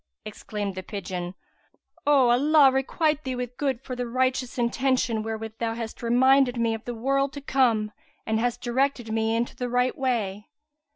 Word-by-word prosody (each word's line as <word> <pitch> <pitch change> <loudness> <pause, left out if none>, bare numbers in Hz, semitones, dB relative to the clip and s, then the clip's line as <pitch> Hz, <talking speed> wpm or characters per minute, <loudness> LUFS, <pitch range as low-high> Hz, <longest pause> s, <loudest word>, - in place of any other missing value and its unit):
Exclaimed 205 -2 -5
the 185 - -5
pigeon, 185 -2 -5 0.7
"Allah 280 +1 +5
requite 300 +3 0
thee 260 -1 -3
with 245 0 -5
good 265 -3 -2
for 255 - -5
the 245 -1 -3
righteous 255 +1 -1
intention 245 -1 +1
wherewith 220 0 -6
thou 225 -1 -1
hast 230 -1 -6
reminded 250 +2 +4
me 230 -1 +1
of 225 - -6
the 240 - -4
world 275 +4 0
to 285 - -6
come 235 -6 +2 0.3
and 220 0 0
hast 240 +1 -1
directed 245 -1 0
me 225 0 +1
into 235 +1 -2
the 250 -1 -3
right 250 +1 +1
way!" 220 -6 -2
245 Hz, 165 wpm, -25 LUFS, 225-265 Hz, 0.7 s, Allah